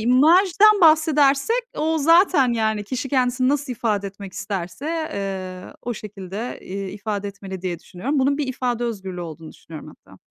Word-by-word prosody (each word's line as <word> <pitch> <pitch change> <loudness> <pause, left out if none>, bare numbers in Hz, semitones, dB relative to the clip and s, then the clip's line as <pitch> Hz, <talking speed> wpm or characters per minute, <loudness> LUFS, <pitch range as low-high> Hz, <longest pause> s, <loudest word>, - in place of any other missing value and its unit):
imajdan 350 - +5
bahsedersek 310 - +4
o 320 +1 0
zaten, 330 -4 +4
yani, 220 -2 0
kişi 255 +5 -4
kendisini 255 -1 +1
nasıl 285 -1 0
ifade 210 -4 -1
etmek 195 -1 -9
isterse, 195 - -5 0.3
eee, 185 -2 -5
o 240 0 -3
şekilde, 210 +2 -7
iii, 195 0 -5
ifade 205 0 -4
etmeli 190 -2 -8
diye 175 -2 -3
düşünüyorum. 270 +12 -3
Bunun 280 +2 +2
bir 290 - -1
ifade 245 -2 -2
özgürlüğü 190 -6 -5
olduğunu 160 -2 -8
düşünüyorum 160 -2 -11
hatta. - - -19
235 Hz, 150 wpm, -22 LUFS, 195-280 Hz, 0.3 s, imajdan